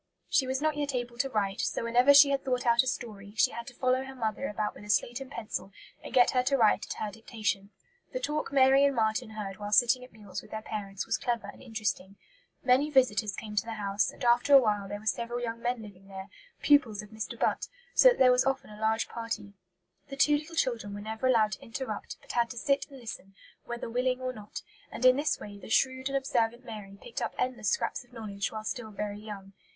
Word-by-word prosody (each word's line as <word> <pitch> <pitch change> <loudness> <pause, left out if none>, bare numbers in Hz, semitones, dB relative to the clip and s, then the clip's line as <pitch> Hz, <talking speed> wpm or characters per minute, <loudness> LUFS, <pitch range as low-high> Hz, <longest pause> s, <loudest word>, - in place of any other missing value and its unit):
She 265 - +3
was 260 +2 -1
not 310 -1 +2
yet 285 -2 -1
able 240 -1 -4
to 270 - +1
write, 200 -5 -1
so - - -1
whenever 245 +4 +5
she 285 0 +8
had 275 -1 0
thought 250 -2 -1
out 235 0 +5
a 260 - -5
story, 210 -5 -5
she - - +4
had 235 0 -7
to 245 - -10
follow 255 +1 +1
her 270 0 -9
mother 225 +2 -2
about 210 0 -2
with - - -13
a 210 - -12
slate 240 +5 +1
and 270 - -8
pencil 215 -6 -5 0.3
and - - -8
get 245 -1 +5
her 250 - +3
to 275 +2 +1
write 215 -4 +3
at - - -3
her 215 - -4
dictation. 210 -2 -3 0.4
The - - -3
talk 300 - -2
Mary 270 0 +6
and 280 -1 +3
Marten 220 +1 0
heard 210 -3 -6
while 205 -1 -6
sitting 245 +3 +4
at 250 - -13
meals 205 -3 -8
with - - -16
their 220 0 -6
parents 200 -3 -5
was - - 0
clever 240 -1 -1
and - - -16
interesting. 210 -5 -3 0.5
Many 260 +4 +4
visitors 225 -7 +2
came 210 -1 -7
to - - +3
the 230 - -5
house, 200 0 0
and - - -10
after 240 +4 +5
a - - +11
while 210 -5 0
there 205 +1 -5
were 215 - -15
several 235 +2 -1
young 230 -1 -4
men 240 -1 -1
living 195 -2 -13
there, 190 0 -8 0.3
pupils 235 -8 +4
of 210 - -13
Mr. 220 0 -6
Butt, - - 0 0.3
so - - +8
that - - +1
there 255 -1 +6
was 250 0 +4
often 270 -5 -1
a 210 +1 -11
large 220 +1 +1
party. 230 -3 -5 0.5
The 275 - -7
two 295 +1 +5
little 310 +3 -5
children 230 -9 -1
were 205 - -6
never 220 +4 -2
allowed 220 -4 +4
to 190 - -6
interrupt, 230 -3 -5
but - - -9
had 235 -1 +1
to 245 - -8
sit 275 +2 +1
and 275 -2 -12
listen, 195 -4 -8 0.3
"whether 240 0 -5
willing 250 +2 0
or 255 0 -3
not"; 210 -3 -8 0.3
and 255 - -3
in 255 0 +8
this 290 +3 0
way 205 -1 -9
the - - -11
shrewd 260 +3 +2
and 275 - +1
observant 240 -2 0
Mary 210 -4 -8
picked 235 - -6
up - - -3
endless 240 -5 -1
scraps - - -1
of 245 - -26
knowledge 205 -3 -4
while 215 -1 -5
still 220 0 -4
very 210 0 -4
young. 200 -2 -9
235 Hz, 240 wpm, -29 LUFS, 210-260 Hz, 0.5 s, a